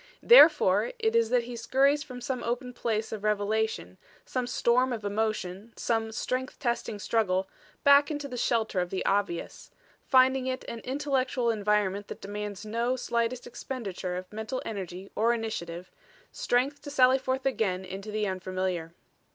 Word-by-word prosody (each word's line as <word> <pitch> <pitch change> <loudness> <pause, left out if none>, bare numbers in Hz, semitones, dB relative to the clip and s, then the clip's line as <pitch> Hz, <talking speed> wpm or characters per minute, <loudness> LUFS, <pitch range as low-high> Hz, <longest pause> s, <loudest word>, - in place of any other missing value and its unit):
Therefore - - +7
it 445 0 0
is 465 0 +3
that 245 -1 +2
he 240 +1 -7
scurries 275 +5 +2
from 250 -3 -8
some 255 0 -3
open 250 +1 -3
place 225 -2 -2
of 215 -2 -5
revelation, 210 - -1 0.3
some 255 -1 -2
storm 250 +1 +2
of 220 -4 -4
emotion, 210 0 -2
some 225 -1 -1
strength 255 +3 -3
testing 235 -5 -2
struggle, 195 -3 0 0.4
back 280 0 +6
into 290 -2 -3
the 250 - -7
shelter 225 -5 0
of 180 -1 -1
the 190 - -3
obvious; 195 -4 -1 0.4
finding 260 0 +4
it 255 0 -3
an 235 - -5
intellectual 260 -2 0
environment 205 -2 0
that - - -8
demands 205 +1 -6
no 235 +4 0
slightest 235 0 -1
expenditure 205 -7 -5
of 185 +2 -8
mental 220 +4 -4
energy 190 -2 -6
or 230 +2 +3
initiative, 180 -6 -5 0.4
strength 260 +4 0
to 290 - -8
sally 265 -2 +4
forth 260 0 -2
again 195 -8 0
into 195 +3 -7
the 215 0 -1
unfamiliar. 185 -3 -3
225 Hz, 155 wpm, -28 LUFS, 200-255 Hz, 0.4 s, Therefore